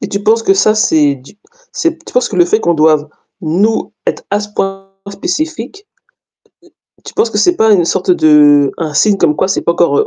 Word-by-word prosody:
Et - - -5
tu 200 0 -4
penses 225 +2 +2
que 195 - +2
ça, 215 +2 +2
c'est 150 -9 +1
du 130 +2 -17 0.4
c'est 335 -1 -2
tu - - -12
penses 250 - +1
que 200 - -6
le 175 - +4
fait 215 +6 0
qu'on 170 -4 0
doive 155 -1 +2 0.3
nous 195 +7 -1
être - - -3
à 205 +1 0
ce 210 - -7
point 195 0 -4 0.2
spécifique, 330 - -5 1.1
m - - -31
tu - - -11
penses 440 +2 0
que - - -3
c'est 355 -1 +2
pas 220 0 +3
une 180 -4 +3
sorte 185 +2 -1
de 150 -4 +4
un 160 -3 -4
signe 205 +5 +2
comme 160 -5 +1
quoi - - 0
c'est 195 - -1
pas 170 - +1
encore 170 -5 +1
heu, - - +1
195 Hz, 225 wpm, -13 LUFS, 155-220 Hz, 1.1 s, le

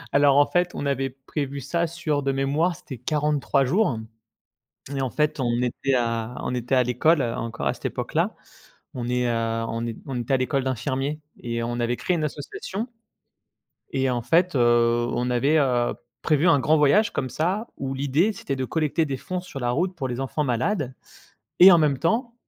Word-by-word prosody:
Alors 140 -1 +5
en 145 - +7
fait 175 +2 0
on - - -3
avait 135 -1 0
prévu 135 +2 -5
ça 170 +6 -1
sur 155 -3 -2
de 135 - 0
mémoire 145 +6 +1
c'était 135 -4 -9
43 145 -1 +1
jours 145 - +2 1.0
et 135 - -1
en 130 - -1
fait, 150 +3 0
on 120 -1 0
était 130 +2 0
à 115 -1 -1
on 125 - -2
était 125 +2 -3
à 130 - +5
l'école, 135 +6 +2
heu, 115 -1 -1
encore 115 0 -3
à - - +1
cette - - -12
époque - - -3
là. - - +1 0.6
On 120 -2 -4
est 125 0 +1
heu, 115 -1 -1
on 115 - -3
n'é 115 -1 -4
on 135 - -5
n'était 120 +2 0
à - - +5
l'école 130 +1 0
d'infirmier 135 +3 -2 0.2
et 115 -1 -3
on 120 +1 -3
avait 120 +1 0
créé 180 - 0
une 155 - -1
association 185 - -5 1.1
Et 135 0 +1
en 120 -1 -1
fait, 170 +7 +2
heu, 120 -1 +3
on 120 +1 -1
avait, 135 +6 +2
heu, 125 -4 +1 0.3
prévu 155 +2 +3
un 165 -4 +5
grand 150 +5 +3
voyage 195 +9 +4
comme 130 - -2
ça 185 - -1
où 135 -1 -3
l'idée 145 +10 +1
c'était 140 - -4
de 130 -1 -2
collecter 160 +2 0
des 135 -3 -3
fonds 185 +7 -4
sur 180 -6 -8
la 120 -2 -1
route 180 +8 -1
pour 140 -6 -3
les 125 0 -4
enfants 135 +3 -1
malades. 130 - -1 0.7
Et 185 +2 +11
en 170 - +7
même 145 -4 +2
temps, 230 - 0
135 Hz, 205 wpm, -24 LUFS, 125-155 Hz, 1.1 s, Et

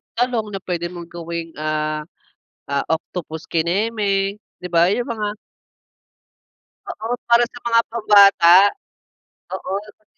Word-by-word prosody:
talong 240 -2 0
na 195 - -3
puwede 175 -1 -3
mong 170 -1 -9
gawing, 170 -1 -6
ah, 155 0 -2 0.7
ah, 140 0 0
octopus 160 -1 -7
kineme, 195 +3 0 0.2
'di 180 - -6
ba, 170 0 +4
yung 240 +4 -1
mga 210 -2 -3 1.5
Oo, 230 +3 -4
para 235 0 +5
sa 245 - -12
mga 230 -1 +4
pambata. 200 -6 +6 1.0
Oo, 195 +1 -3
sa 210 +1 -16
195 Hz, 120 wpm, -20 LUFS, 170-215 Hz, 1.5 s, pambata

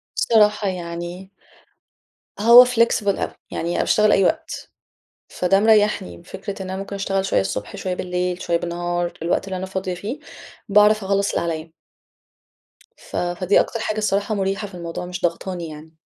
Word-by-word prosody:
الصراحة 210 -2 +3
يعني 175 +1 -6 1.1
هو 235 +4 +9
flexible 230 -4 +1
أوي، - - -2 0.2
يعني 170 +1 -3
أنا - - 0
باشتغل 210 0 +3
أي 195 - +4
وقت، - - -2 0.6
فده 195 +2 +2
مريَّحني، 210 - +2
فكرة 195 0 -7
إن 185 - -6
أنا 190 - -4
ممكن 195 +1 -6
أشتغل 195 -1 -1
شويَّة 195 - +2
الصبح، 95 +2 -4
شويَّة 185 -1 -3
بالليل، 180 0 -2
شويَّة 170 - +1
بالنهار، 175 0 -2
الوقت 170 +2 0
اللي 190 -1 -4
أنا 190 - -4
فاضية 190 -1 -3
فيه، 215 +11 -5 0.5
باعرف 210 0 +5
أخلَّص 200 +1 +1
اللي - - +1
عليا. 160 0 -7 1.2
ف - - -10
فدي 175 +2 +2
أكتر 230 - -2
حاجة 215 0 -2
الصراحة 205 0 0
مُريحة 195 +1 -1
في - - -15
الموضوع، 170 0 -6
مش 180 0 -6
ضاغطاني 175 0 -2
يعني. 155 +1 -11
190 Hz, 160 wpm, -21 LUFS, 175-205 Hz, 1.2 s, هو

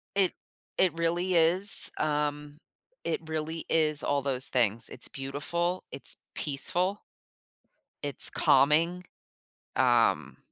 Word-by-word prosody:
It 195 -2 +2 0.4
it 185 -3 +4
really 175 +2 0
is, 180 +5 +4
um, 150 0 -2 0.4
it 165 - -1
really 160 +1 -4
is 155 -2 +1
all 140 -1 +1
those 130 -1 -2
things, 115 -3 0
it's - - -8
beautiful, 170 +7 -3
it's 135 - -4 0.2
peaceful 175 +7 -1 1.0
it's 145 -1 +3
calming, 160 +6 +3 0.7
um - - +2
155 Hz, 105 wpm, -29 LUFS, 145-175 Hz, 1.0 s, it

